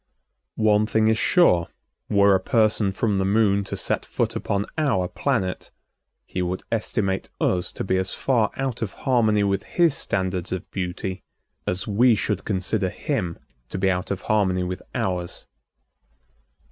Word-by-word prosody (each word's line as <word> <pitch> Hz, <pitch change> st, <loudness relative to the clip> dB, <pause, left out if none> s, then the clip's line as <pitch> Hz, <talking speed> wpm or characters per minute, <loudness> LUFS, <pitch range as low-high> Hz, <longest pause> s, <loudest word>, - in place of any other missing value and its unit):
One 110 Hz, -1 st, +3 dB
thing 110 Hz, 0 st, +2 dB
is 110 Hz, -, +2 dB
sure, 90 Hz, -, +4 dB, 0.4 s
were 100 Hz, -1 st, +5 dB
a 95 Hz, -, +4 dB
person 110 Hz, -1 st, +2 dB
from 100 Hz, 0 st, 0 dB
the -, -, +1 dB
Moon 100 Hz, 0 st, +3 dB
to -, -, -4 dB
set -, -, 0 dB
foot -, -, -2 dB
upon 100 Hz, 0 st, -1 dB
our 135 Hz, -, +1 dB
planet, 90 Hz, +1 st, -2 dB, 0.6 s
he 90 Hz, -, -4 dB
would 90 Hz, +1 st, -2 dB
estimate 105 Hz, -3 st, -1 dB
us 90 Hz, -1 st, 0 dB
to -, -, -4 dB
be 95 Hz, -1 st, +1 dB
as 95 Hz, 0 st, -1 dB
far 120 Hz, -5 st, +2 dB
out 135 Hz, -3 st, -2 dB
of 115 Hz, -, -3 dB
harmony 110 Hz, -6 st, +3 dB
with 100 Hz, -1 st, +1 dB
his 170 Hz, +1 st, +2 dB
standards 95 Hz, -2 st, -1 dB
of 95 Hz, -2 st, -4 dB
beauty 95 Hz, 0 st, -4 dB, 0.5 s
as 90 Hz, +1 st, -1 dB
we 115 Hz, +3 st, +4 dB
should 100 Hz, -1 st, -2 dB
consider 95 Hz, 0 st, 0 dB
him 95 Hz, -, -3 dB, 0.3 s
to -, -, -4 dB
be 95 Hz, 0 st, +2 dB
out 90 Hz, 0 st, -2 dB
of 100 Hz, -1 st, -3 dB
harmony 95 Hz, -4 st, +1 dB
with 90 Hz, 0 st, -4 dB
ours. 90 Hz, -2 st, -3 dB
100 Hz, 160 wpm, -24 LUFS, 95-110 Hz, 0.6 s, were